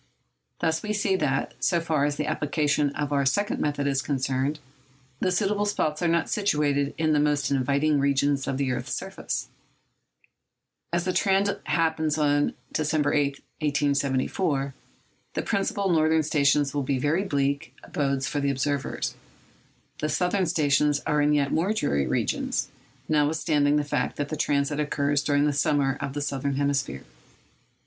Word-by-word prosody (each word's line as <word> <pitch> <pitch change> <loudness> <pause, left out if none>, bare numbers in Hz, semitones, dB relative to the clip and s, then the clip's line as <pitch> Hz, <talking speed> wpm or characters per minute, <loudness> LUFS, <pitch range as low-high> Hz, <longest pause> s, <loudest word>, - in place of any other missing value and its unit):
Thus 160 -1 +1
we 210 0 -2
see 200 -2 +1
that, 135 -5 -1
so 175 - +3
far 160 -4 0
as 145 0 0
the 150 - -2
application 150 -1 +1
of 145 0 -2
our 140 -1 +2
second 200 +10 0
method 145 -1 -1
is 135 -1 +1
concerned, 135 +1 -1 0.6
the 185 - +1
suitable 205 +3 +1
spots 155 -6 -1
are 175 - +2
not 170 0 +2
situated 145 -8 0
in 155 -1 +2
the 150 - +3
most 145 -2 +1
inviting 140 +3 +2
regions 140 0 +1
of 135 - -1
the 135 -2 0
earth's 125 0 -3
surface. - - -4 1.4
As 170 0 0
the 185 - 0
transit 195 +1 +1
happens 160 -2 +1
on 145 -1 +2 0.2
December 150 -1 +1
8, 145 -1 +3 0.3
1874, 140 0 0 0.6
the - - -1
principal 200 0 0
northern 160 -1 +3
stations 145 -2 +2
will 145 - 0
be 135 0 0
very 150 +8 +1
bleak 140 -7 -1
abodes 135 -2 -1
for 145 - -2
the 140 0 0
observers. 140 +1 -2 0.9
The 155 - -1
southern 180 +5 +1
stations 150 -2 +2
are 150 0 +2
in 145 0 +3
yet 145 -2 +2
more 185 +6 +1
dreary 70 - 0
regions,—notwithstanding 145 - 0
the 150 - +2
fact 135 -3 -1
that 145 0 -3
the 155 - -2
transit 145 0 0
occurs 145 -1 +1
during 145 0 +2
the 150 - +1
summer 140 -1 +1
of 135 - -3
the 145 - -2
southern 140 0 -2
hemisphere. 140 - -1
145 Hz, 155 wpm, -26 LUFS, 140-155 Hz, 1.4 s, so